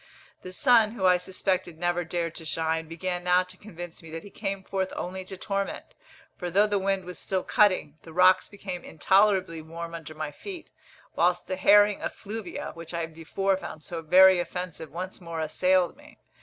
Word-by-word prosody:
The 185 - -8
sun, 230 0 +4
who 210 -5 -2
I 180 -1 +6
suspected 180 -2 -2
never 175 +1 0
dared 170 0 -2
to 165 - -8
shine, 160 0 -1
began 175 +2 -3
now 180 +1 +4
to 180 0 -13
convince 175 -4 -9
me 165 - -12
that 165 +1 -6
he 205 - -12
came 195 -2 -4
forth 190 -1 -2
only 185 +1 -4
to 190 0 -8
torment; 200 +1 -3 0.4
for 180 - -4
though 200 +4 +4
the 205 -1 +1
wind 195 -1 0
was 180 0 -7
still 190 -1 -2
cutting, 185 -7 +2
the 165 - -12
rocks 185 +2 +5
became 190 -3 -6
intolerably 190 0 +2
warm 165 +1 -7
under 160 -2 -8
my 155 -1 -4
feet, 360 - -9 0.4
whilst 175 +1 +2
the 185 - -2
herring 205 +2 +5
effluvia, 210 -3 -5
which 170 0 -8
I 170 -1 -1
before 165 +4 -1
found 155 -4 -8
so 170 0 -4
very 185 +3 +7
offensive, 175 -3 -5
once 185 +4 -6
more 170 -2 -5
assailed 180 +4 +2
me. 295 +2 -17
180 Hz, 185 wpm, -27 LUFS, 165-195 Hz, 0.4 s, very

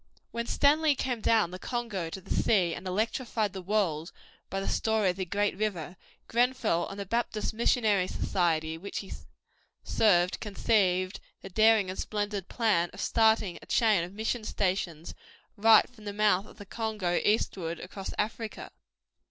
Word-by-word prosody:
When 235 0 -3
Stanley 300 +1 +3
came 250 -4 -2
down 215 -7 +3
the 185 - -7
Congo 220 -9 -3
to 190 - -6
the 185 - -5
sea 180 -6 +2
and 185 - -7
electrified 215 +1 -1
the 190 - -6
world 180 -5 -1 0.4
by 195 - -2
the 195 - -4
story 220 -4 +1
of - - -9
the 190 0 -3
great 205 +3 0
river, 185 -5 -3 0.3
Grenfell 235 -7 +1
and 195 - -8
the 200 - -4
Baptist 230 +1 -2
Missionary 215 -4 +2
Society 160 -4 -1
which 200 +3 -6
he - - -8 0.7
served 180 -4 +2
conceived 195 -3 +1 0.2
the 195 - -7
daring 215 -1 +4
and 190 - -8
splendid 205 -2 -3
plan 205 -8 +1
of - - -11
starting 220 -5 +2
a - - -15
chain 215 -7 +3
of 175 - -7
mission 220 +3 -2
stations 180 -6 -2 0.4
right 220 +1 +6
from 225 -4 -17
the 205 - -4
mouth 205 -1 +2
of - - -16
the 205 - -10
Congo 210 -4 -1
eastward 180 -5 0
across 190 +1 -7
Africa. 220 +1 -4
205 Hz, 160 wpm, -29 LUFS, 180-220 Hz, 0.7 s, right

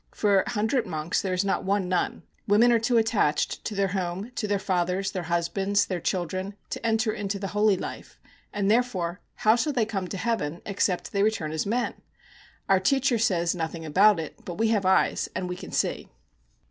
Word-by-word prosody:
For 200 -2 +3
a - - -6
hundred 230 +2 0
monks 155 +1 -1
there 185 -2 -1
is 180 +2 0
not 195 - 0
one 195 -1 0
nun. 180 -1 -1 0.2
Women 220 +4 +5
are 235 - +4
too 235 +2 +2
attached 215 -10 +1
to 215 - -3
their 195 -1 +1
home, 190 +3 -3
to 215 - -2
their 205 0 +1
fathers, 190 0 -1
their 185 - -3
husbands, 195 +4 +1
their 185 -2 -3
children, 185 +3 -2 0.2
to - - -5
enter 225 -1 +1
into 205 -2 -3
the 195 -1 -4
holy 210 -1 +3
life; - - -8 0.3
and, 205 -1 0
therefore, 200 -7 0
how 220 +1 +4
shall 290 +5 0
they 240 -5 +2
come 195 -4 -3
to 195 - -5
heaven 180 -8 -2
except 190 -2 -1
they 200 - 0
return 205 -8 0
as 160 +4 -2
men? 235 +3 0 0.7
Our 195 -1 +4
teacher 255 +4 +2
says 175 -6 +2
nothing 165 -1 -4
about 195 +5 +5
it, 160 -3 -7
but 175 - -7
we 225 +1 +2
have 205 -4 +1
eyes, 190 - +2
and 185 - -2
we 180 - -4
can - - -9
see.' - - -1
195 Hz, 200 wpm, -26 LUFS, 180-220 Hz, 0.7 s, Women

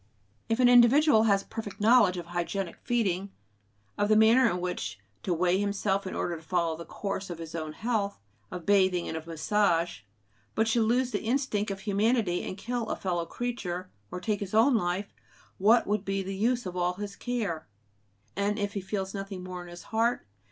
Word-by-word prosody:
If 225 +2 +1
an 250 - +6
individual 245 0 +6
has 200 -2 +3
a - - -25
perfect 215 -3 -7
knowledge 215 -4 +5
of 175 - -5
hygienic 175 +2 -3
feeding, 200 -6 0 0.7
of 205 0 +2
the 215 - +5
manner 225 +3 +6
in 180 - -2
which 175 - -3 0.2
to - - -3
weigh 180 +2 +2
himself 200 -1 0
in - - -5
order 175 - -1
to - - -12
follow 170 -1 0
the 170 +1 -8
course 195 +2 -4
of 175 - -5
his 165 -1 -8
own 155 -2 -4
health, 215 -1 -2 0.3
of 180 -2 -7
bathing 185 -3 +3
and - - -4
of 160 0 -6
massage, 170 - +1 0.6
but 220 0 +2
should 225 0 +2
lose 245 +3 +1
the - - -1
instinct 225 -4 0
of 195 -1 -5
humanity 205 -2 +1
and 185 - -5
kill 235 +2 -3
a - - -1
fellow 175 -3 -2
creature, 185 -7 -4 0.2
or 180 - -5
take 205 +2 -1
his 200 0 -4
own 230 +5 +5
life, 190 -2 -1 0.5
what 225 +5 +5
would 205 -1 0
be 195 -1 -1
the 195 +1 -5
use 240 +4 +1
of 180 -1 -5
all 180 0 +1
his 200 +1 -6
care? 210 -11 -3 0.7
And 205 +1 0
if 205 -1 -2
he 200 - -3
feels 190 0 -3
nothing 195 -2 -6
more 180 -1 -6
in 175 - -10
his 175 0 -10
heart? 230 +2 0
200 Hz, 200 wpm, -28 LUFS, 180-220 Hz, 0.7 s, an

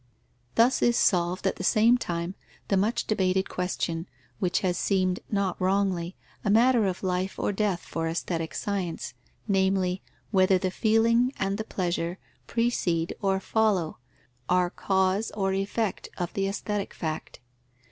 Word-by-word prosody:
Thus 240 +3 +4
is 240 -1 +3
solved 180 +1 +2
at 190 - +1
the - - -5
same 220 +5 +5
time 175 -6 -3 0.4
the 195 - +3
much 205 +5 +1
debated 190 -2 +1
question, 175 -2 -2 0.3
which 180 -2 +1
has 180 -2 +1
seemed, 185 -1 +1
not 200 -4 -1
wrongly, 185 -2 +1 0.3
a 210 - 0
matter 230 0 +5
of 185 0 -3
life 185 +1 -1
or - - 0
death 200 -3 0
for 165 0 -3
aesthetic 165 0 -3
science, 185 -9 -3 0.3
namely, 190 -2 +1 0.3
whether 190 -2 +4
the 185 0 -1
feeling 230 +4 +3
and 195 +2 -1
the - - -1
pleasure 175 -3 -2 0.3
precede 180 -8 0
or 195 -1 +1
follow, 200 -6 +1 0.5
are 180 0 +3
cause 190 +2 +1
or 195 -1 +1
effect 195 +2 -2
of 175 -2 -3
the 195 0 0
aesthetic 200 0 -3
fact. 160 -2 -5
190 Hz, 145 wpm, -27 LUFS, 180-205 Hz, 0.5 s, same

